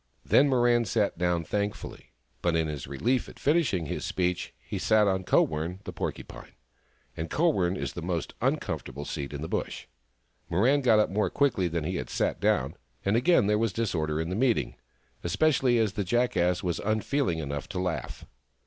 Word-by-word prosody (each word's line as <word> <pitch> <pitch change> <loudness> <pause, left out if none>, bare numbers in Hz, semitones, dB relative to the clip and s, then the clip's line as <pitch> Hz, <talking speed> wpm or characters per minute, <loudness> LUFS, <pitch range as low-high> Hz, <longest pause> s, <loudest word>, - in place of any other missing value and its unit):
Then 140 +1 +5
Mirran 120 -3 +3
sat 100 -4 0
down 90 -1 +1
thankfully, 100 -9 -4 0.3
but 85 -1 +1
in 80 -1 +1
his 75 -4 -5
relief 80 - 0
at - - -14
finishing 140 - +1
his - - -4
speech 90 -1 -1
he - - -6
sat 110 -1 +4
on 95 -1 +1
Kowern, 80 +1 +1
the - - -7
Por - - -2
cupine; - - -12 0.6
and 80 0 -4
Kowern 95 - +1
is - - -4
the 85 - -6
most 85 -1 -3
uncomfortable 70 +2 -2
seat 70 -2 -4
in 70 0 -5
the - - -3
Bush. - - -3 0.6
Mirran 125 +11 +3
got 120 -5 +5
up 105 -3 +2
more 105 +2 +1
quickly 130 -11 +1
than 85 -1 -2
he 90 +4 -2
had - - -5
sat - - -1
down, - - +1 0.3
and 100 +2 +2
again 125 - +4
there 105 +1 +2
was 115 -2 +1
disorder 80 -9 -1
in 80 +1 -2
the 90 - -2
meeting, 110 - +1 0.5
especially 130 - +2
as 110 -3 +1
the 105 - -1
Jackass 90 -4 +1
was 90 -2 -1
unfeeling 110 - 0
enough 70 +3 -4
to 95 -3 -3
laugh. 90 -3 -3
95 Hz, 185 wpm, -28 LUFS, 80-115 Hz, 0.6 s, Then